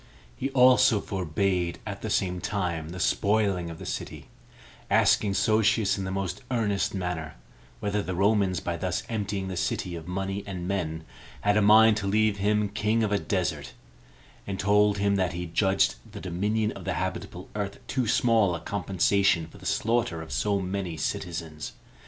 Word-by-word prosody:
He 135 Hz, -, -2 dB
also 125 Hz, -4 st, +6 dB
forbade, 90 Hz, -1 st, -1 dB
at -, -, -6 dB
the -, -, -4 dB
same 90 Hz, -1 st, 0 dB
time, 85 Hz, -6 st, -2 dB
the 90 Hz, +2 st, -7 dB
spoiling 100 Hz, -2 st, +1 dB
of 80 Hz, -, -8 dB
the -, -, -9 dB
city, -, -, -6 dB, 0.6 s
asking 100 Hz, -2 st, +3 dB
Sosius 110 Hz, +1 st, +3 dB
in 95 Hz, -, -4 dB
the -, -, -3 dB
most 95 Hz, +1 st, -3 dB
earnest 105 Hz, -6 st, 0 dB
manner, 90 Hz, -4 st, -3 dB, 0.5 s
whether 105 Hz, 0 st, 0 dB
the 95 Hz, -2 st, -4 dB
Romans, 100 Hz, -1 st, +2 dB
by 85 Hz, -1 st, -3 dB
thus 90 Hz, +1 st, -2 dB
emptying 100 Hz, -3 st, -2 dB
the 95 Hz, -, -4 dB
city 90 Hz, 0 st, -2 dB
of 80 Hz, -1 st, -8 dB
money 95 Hz, +2 st, -3 dB
and 90 Hz, -3 st, -5 dB
men, 80 Hz, -5 st, -2 dB, 0.4 s
had 105 Hz, 0 st, +2 dB
a 105 Hz, -, +4 dB
mind 110 Hz, +1 st, +7 dB
to 100 Hz, -2 st, -2 dB
leave 105 Hz, 0 st, +2 dB
him 105 Hz, +1 st, +1 dB
king 105 Hz, +2 st, 0 dB
of 105 Hz, -, 0 dB
a 100 Hz, -, +2 dB
desert, 85 Hz, -7 st, -2 dB, 0.7 s
and 95 Hz, -1 st, -4 dB
told 105 Hz, +1 st, +3 dB
him 100 Hz, 0 st, +2 dB
that 95 Hz, -2 st, 0 dB
he 90 Hz, +1 st, -4 dB
judged 95 Hz, +3 st, +2 dB, 0.2 s
the -, -, -8 dB
dominion 105 Hz, +5 st, -1 dB
of -, -, -9 dB
the -, -, -2 dB
habitable -, -, -4 dB
earth -, -, -3 dB
too 130 Hz, -3 st, -1 dB
small 110 Hz, -5 st, +3 dB
a -, -, -5 dB
compensation 95 Hz, -1 st, +1 dB
for 80 Hz, -, -15 dB
the -, -, -7 dB
slaughter 115 Hz, -6 st, 0 dB
of 80 Hz, -, -11 dB
so 100 Hz, +11 st, +1 dB
many 95 Hz, -3 st, -3 dB
citizens. 80 Hz, -2 st, -4 dB
100 Hz, 175 wpm, -27 LUFS, 90-105 Hz, 0.7 s, mind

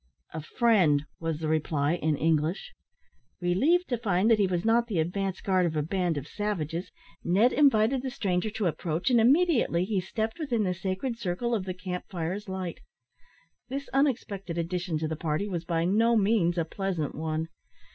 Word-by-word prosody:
"A 160 Hz, -, -4 dB
friend," 170 Hz, -, +3 dB
was 165 Hz, -2 st, -2 dB
the 155 Hz, 0 st, -3 dB
reply, 155 Hz, -1 st, +1 dB
in 160 Hz, -3 st, 0 dB
English. 160 Hz, -, 0 dB, 0.7 s
Relieved 270 Hz, -, +2 dB
to 245 Hz, -3 st, -1 dB
find 205 Hz, -1 st, +2 dB
that 220 Hz, -, +5 dB
he 200 Hz, -, +3 dB
was 180 Hz, 0 st, -2 dB
not 235 Hz, +1 st, +3 dB
the 210 Hz, -7 st, -2 dB
advance 190 Hz, +4 st, -1 dB
guard 185 Hz, -2 st, +2 dB
of 160 Hz, -, -3 dB
a 150 Hz, -, +1 dB
band 175 Hz, -1 st, -1 dB
of 140 Hz, 0 st, -5 dB
savages, 175 Hz, -5 st, -3 dB, 0.3 s
Ned 205 Hz, +8 st, +3 dB
invited 260 Hz, -3 st, +4 dB
the 265 Hz, -, -3 dB
stranger 195 Hz, -4 st, -1 dB
to 215 Hz, -1 st, -3 dB
approach, 170 Hz, -, -1 dB
and 240 Hz, -2 st, +5 dB
immediately 260 Hz, -, +3 dB
he 200 Hz, -2 st, 0 dB
stepped 220 Hz, -, -3 dB
within 245 Hz, -8 st, 0 dB
the 185 Hz, -2 st, 0 dB
sacred 190 Hz, +6 st, -3 dB
circle 235 Hz, +4 st, -2 dB
of 205 Hz, -5 st, -1 dB
the 185 Hz, -1 st, -4 dB
camp 180 Hz, -1 st, -5 dB
fire's 185 Hz, +3 st, -4 dB
light. 185 Hz, -2 st, -4 dB, 0.9 s
This 275 Hz, +2 st, -5 dB
unexpected 215 Hz, -, 0 dB
addition 175 Hz, 0 st, -2 dB
to 155 Hz, +1 st, -2 dB
the 160 Hz, -, -3 dB
party 155 Hz, +5 st, -2 dB
was 175 Hz, -4 st, -4 dB
by 165 Hz, -1 st, 0 dB
no 225 Hz, +5 st, +3 dB
means 195 Hz, -5 st, +2 dB
a 165 Hz, -, +1 dB
pleasant 175 Hz, -4 st, -3 dB
one. 160 Hz, +1 st, -3 dB
185 Hz, 180 wpm, -28 LUFS, 165-225 Hz, 0.9 s, that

